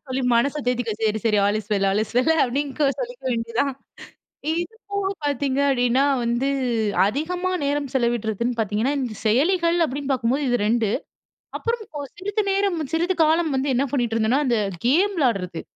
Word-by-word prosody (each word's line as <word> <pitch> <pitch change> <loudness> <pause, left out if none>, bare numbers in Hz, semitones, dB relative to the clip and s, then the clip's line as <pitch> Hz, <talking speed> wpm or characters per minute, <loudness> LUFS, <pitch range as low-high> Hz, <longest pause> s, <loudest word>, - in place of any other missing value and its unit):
சொல்லி 260 +1 -2
மனச 280 +5 +2
தேத்திக்க. 245 -3 0
"சரி 220 0 +1
சரி 215 -2 +3
all 205 +1 +2
is 210 - -17
well, 195 -1 +2
all 200 - +1
is 215 - -7
well" 255 +6 +3
அப்டின்னு 275 +2 -1
கொ 295 - +3
சொல்லிக்க - - -6
வேண்டியது 230 -1 -3
தான். 275 -2 -2 0.8
இது 345 +7 -3 0.2
போக 400 -1 -1 0.2
பாத்தீங்க 280 -1 0
அப்டின்னா 255 +1 +2 0.2
வந்து 235 +3 0 0.6
அதிகமா 350 - -2
நேரம் 285 -1 -1
செலவிடுறதுன்னு 235 -1 0
பாத்தீங்கன்னா, 220 +6 0
இந்த 245 -4 -3
செயலிகள் 335 - +3
அப்டின்னு 280 0 -3
பாக்கும்போது 260 +3 0
இது 245 - +2
2. 225 -2 +2 0.7
அப்புறம் 465 -1 -2 0.4
சிறிது 410 +3 -1
நேரம் 390 -3 +1 0.2
சிறிது 345 +3 +1
காலம் 320 +1 +2
வந்து 270 +2 0
என்ன 265 +3 +2
பண்ணிக்ட்டு 240 -5 0
இருந்தேன்னா, 225 +6 +2
அந்த 240 -3 +2 0.3
கேம் 360 +11 +3
விளாடுறது. 195 - 0
265 Hz, 165 wpm, -23 LUFS, 230-320 Hz, 0.8 s, சரி